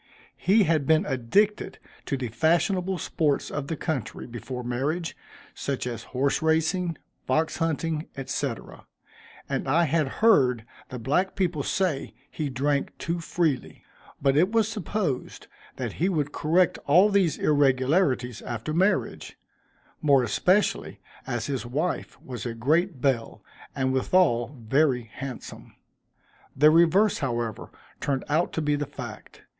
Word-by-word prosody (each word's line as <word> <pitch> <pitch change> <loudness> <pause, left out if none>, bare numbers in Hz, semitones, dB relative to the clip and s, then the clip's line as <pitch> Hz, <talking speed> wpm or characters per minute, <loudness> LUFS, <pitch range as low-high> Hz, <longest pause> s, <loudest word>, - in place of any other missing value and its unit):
He 205 +4 +4
had 155 -6 +1
been 160 0 +4
addicted 200 - +1 0.3
to 140 - -1
the 125 -3 -4
fashionable 175 - +1
sports 150 -4 -1
of 145 -1 -4
the 160 - -2
country, 145 -5 -4
before 125 +1 -6
marriage, 140 +8 -2 0.4
such 140 -3 -3
as 120 -2 -5
horse 135 +2 0
racing, 160 +1 +1 0.3
fox 155 +5 +1
hunting, 165 -1 -1 0.2
&c., - - -1 1.0
and - - -2
I 160 +6 +3
had 155 -1 +1 0.2
heard 130 - +4 0.2
the 125 - -6
black 145 +11 0
people 180 -6 0
say 165 -2 -1 0.2
he 150 -3 -3
drank 140 +2 -1
too 170 +1 -3
freely; 165 -5 -2 0.4
but 135 0 +2
it 180 +7 +3
was 225 -2 +3
supposed 200 - -3 0.3
that - - -4
he 180 - +3
would 150 -6 -1
correct 165 +4 +2
all 180 +8 +6
these 195 -7 +2
irregularities 135 - +2
after 120 +5 -4
marriage, 190 +5 0 0.6
more 140 -4 +4
especially 180 - +1 0.3
as 120 -3 -2
his 135 -3 -2
wife 145 +9 -3
was 125 -2 -7
a 120 -2 -4
great 155 +5 +1
belle, 130 -5 -1 0.3
and 130 -1 0
withal 130 -3 +2
very 130 -3 +2
handsome. 135 -2 -8 0.8
The 150 +3 +6
reverse, 170 +6 +4
however, 120 -5 -3 0.3
turned 135 -2 -1
out 160 +4 +1
to 160 - -1
be 145 0 +2
the 145 -1 -3
fact. - - -10
150 Hz, 135 wpm, -26 LUFS, 130-170 Hz, 1.0 s, all